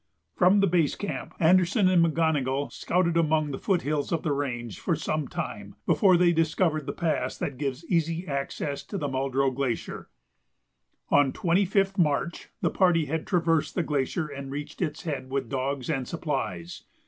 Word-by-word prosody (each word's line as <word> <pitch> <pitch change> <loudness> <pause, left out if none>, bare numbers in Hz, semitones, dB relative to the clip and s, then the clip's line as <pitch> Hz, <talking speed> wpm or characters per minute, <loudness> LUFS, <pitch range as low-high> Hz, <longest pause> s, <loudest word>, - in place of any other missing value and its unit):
From 190 +3 +5
the - - +5
base 170 -5 +2
camp 205 - -5
Anderson 185 +4 +4
and 180 -2 +5
McGonogill 150 -4 +1
scouted 170 -1 0
among 155 -2 +2
the 135 - -5
foot 190 -4 0
hills 145 -1 -1
of 165 -2 0
the 155 - 0
range 120 -7 -3
for - - 0
some 155 -3 -2
time - - -6
before 185 -3 +4
they 175 0 +4
discovered 160 -2 +1
the - - -1
pass 165 -3 -1
that 130 -3 -4
gives 140 +2 -3
easy 165 0 0
access 140 0 -3
to 200 - -5
the 145 - -2
Muldrow 135 0 0
Glacier. 130 -3 -3 1.0
On 145 -2 +5
25th 195 +2 +1
March 155 +1 0
the - - +2
party 175 -4 +3
had 160 +3 -3
traversed 165 -4 +1
the 175 - +1
glacier 150 +2 -1
and 140 -2 -7
reached 145 +4 -6
its 155 -2 -2
head 145 -6 -4
with 135 0 -2
dogs 135 -1 -2
and 135 -6 -1
supplies. 135 - -4
155 Hz, 170 wpm, -27 LUFS, 140-175 Hz, 1.0 s, From